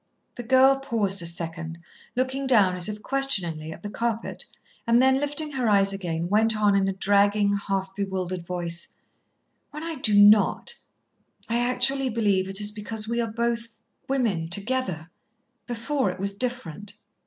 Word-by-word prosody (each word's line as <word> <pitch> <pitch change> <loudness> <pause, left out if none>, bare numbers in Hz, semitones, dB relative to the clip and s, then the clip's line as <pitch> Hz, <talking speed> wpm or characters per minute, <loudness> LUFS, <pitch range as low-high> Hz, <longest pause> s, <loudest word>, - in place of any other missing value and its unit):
The - - -7
girl 265 +2 +4
paused 215 -8 0
a 170 - -2
second, 165 -1 -5 0.4
looked 260 +1 0
down, 205 -8 +4
as 180 +3 +1
if 210 0 -6
questioningly, 175 - -1
at 160 - -11
the 205 - -5
carpet, 230 +2 -3 0.4
and 235 +1 +5
then, 265 +1 +4
lifting 290 +1 -3
her 255 -5 0
eyes 195 -1 +3
again, 170 -3 -3
went 220 +3 +2
on 205 -1 +3
in 195 -1 +2
a 195 - 0
dragging, 200 +1 +3
half 195 -1 -3
bewildered 185 -3 -3
voice: 170 -1 -4 0.7
"When 300 +1 -8
I 330 -2 -4
do 210 -5 +3
not, 205 0 +5 0.7
I 235 +1 0
actually 250 +2 +2
believe 205 -5 +1
it 195 +1 -1
is 205 0 +2
because 215 +1 -5
we 235 +1 0
are 230 - -1
both 230 0 -3 0.3
women 215 -12 0
together. 195 -4 -3 0.6
Before, 245 0 -1
it 180 - -6
was 200 +1 0
different." 205 -4 -4
210 Hz, 160 wpm, -25 LUFS, 190-245 Hz, 0.7 s, and